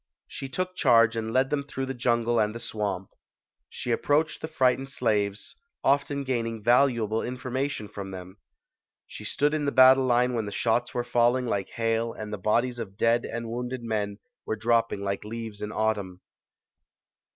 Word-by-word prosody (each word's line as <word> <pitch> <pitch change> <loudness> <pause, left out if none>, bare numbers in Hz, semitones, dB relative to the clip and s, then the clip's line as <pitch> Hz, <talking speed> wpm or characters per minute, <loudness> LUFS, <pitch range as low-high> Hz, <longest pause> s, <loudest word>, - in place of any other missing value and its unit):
She 135 - -7
took 185 +6 -3
charge 115 -7 +4
and 110 -1 -3
led 130 +2 +2
them 145 -1 +1
through 135 -1 -4
the 135 - -4
jungle 120 -1 +1
and 105 +1 0
the - - -5
swamp. 100 -5 -3 0.6
She 120 - -3
ap - - -1
proached 150 +2 +1
the - - -5
frightened 130 -1 +1
slaves, 105 -6 -1 0.3
often 140 +1 +1
gaining 115 -4 -2
valuable 120 -3 +3
information 130 -1 -3
from 100 -1 -7
them. 95 +1 -9 0.7
She - - -10
stood 145 +1 +1
in 155 -1 0
the 140 - +1
battle 130 0 +7
line 125 0 +2
when 115 -3 -2
the - - -5
shots 120 +3 0
were 120 - 0
falling 120 +1 +2
like 100 -5 -2
hail 115 0 -1
and 105 -1 -7
the 105 - -4
bodies 120 +5 +1
of 100 -4 -7
dead 115 +1 +2
and 115 0 -5
wounded 125 +1 -4
men 105 -3 -2 0.3
were 110 - -2
dropping 115 -2 +1
like 100 0 -2
leaves 110 -1 -6
in 105 - -4
autumn. 105 -5 -1
115 Hz, 175 wpm, -27 LUFS, 110-130 Hz, 0.7 s, battle